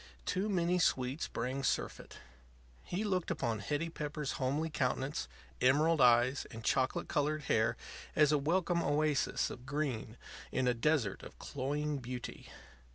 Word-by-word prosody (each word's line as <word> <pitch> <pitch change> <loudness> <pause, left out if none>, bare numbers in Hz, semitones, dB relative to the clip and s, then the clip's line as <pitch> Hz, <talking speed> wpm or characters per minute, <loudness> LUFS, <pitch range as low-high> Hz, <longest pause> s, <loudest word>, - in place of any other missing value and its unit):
Too 200 +2 0
many 180 -2 +2
sweets 130 -2 +1
bring 130 +3 -3
surfeit. - - -2 0.7
He 185 - -2
looked 185 -4 0
upon 115 -2 -1
Hetty 145 +10 -2
Pepper's 150 -2 -3
homely 145 +5 0
countenance, 135 - -1 0.3
emerald 150 +5 +4
eyes, 125 +2 +5
and 115 0 -9
chocolate 130 +1 +1
colored 150 +1 0
hair 115 0 +2 0.4
as 150 -1 +5
a 150 - +3
welcome 170 +3 +1
oasis 150 -1 +1
of 125 +1 -10
green 130 -6 -2 0.3
in 130 -1 +1
a 125 - +4
desert 120 -4 +1
of - - -11
cloying 145 +2 -2
beauty. 125 0 -7
145 Hz, 140 wpm, -34 LUFS, 125-155 Hz, 0.7 s, eyes